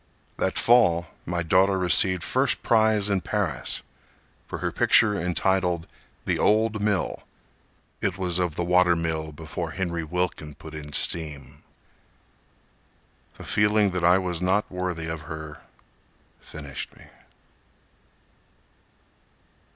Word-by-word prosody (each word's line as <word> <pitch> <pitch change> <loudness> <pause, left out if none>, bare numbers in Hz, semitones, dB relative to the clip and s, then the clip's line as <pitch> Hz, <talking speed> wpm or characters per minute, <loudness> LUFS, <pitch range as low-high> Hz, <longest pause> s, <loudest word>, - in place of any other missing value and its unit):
That - - -1
fall 85 -9 +4 0.2
my 85 0 -1
daughter 95 +3 +3
received 90 0 +3
first - - +1
prize 110 -2 +3
in 100 -2 +1
Paris 95 - -2 0.6
For - - -5
her - - -2
picture, 105 - +4
entitled, 90 -1 0 0.4
"The - - 0
Old 110 0 +2
Mill"— 105 -3 0 0.8
(It 95 -2 -1
was 90 -2 -1
of 90 -4 -1
the 85 - -1
water 90 0 +4
mill 80 -2 -2
before 80 +2 -6
Henry 85 -3 -2
Wilkin 80 -3 -3
put 80 - -11
in 75 -1 -8
steam.) 75 -4 -4 1.8
The - - -10
feeling 105 -1 +2
that 90 -1 -3
I 90 +2 +6
was 90 -3 -2
not 95 +3 +1
worthy 90 -3 -3
of 80 -1 -5
her 80 -1 -8 0.8
finished 70 -3 -8
me. - - -15
90 Hz, 120 wpm, -25 LUFS, 80-95 Hz, 1.8 s, I